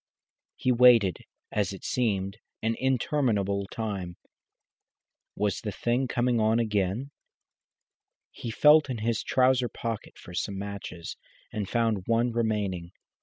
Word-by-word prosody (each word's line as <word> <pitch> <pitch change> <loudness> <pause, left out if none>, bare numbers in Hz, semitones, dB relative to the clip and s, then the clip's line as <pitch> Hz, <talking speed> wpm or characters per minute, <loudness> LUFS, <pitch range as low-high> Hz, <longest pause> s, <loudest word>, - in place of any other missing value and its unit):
He 130 - +1
waited, 120 -6 +5 0.3
as 100 -2 0
it 95 - -10
seemed, 100 -4 -1 0.2
an 115 +1 +1
interminable 115 -7 +1
time. 95 -5 -4 1.2
Was 105 -2 -1
the 105 - -3
thing 120 +5 0
coming 120 -1 +1
on 110 +1 +3
again? 105 +3 0 1.2
He 120 - -7
felt 150 +5 +5
in 125 - -2
his 110 0 -1
trouser 130 -1 +2
pocket 115 -3 -5
for 90 - -12
some 95 +3 -2
matches, 100 -4 -6 0.4
and 105 -3 -3
found 115 -5 0
one 115 +1 +2
remaining. 105 -7 -1
110 Hz, 120 wpm, -28 LUFS, 100-120 Hz, 1.2 s, waited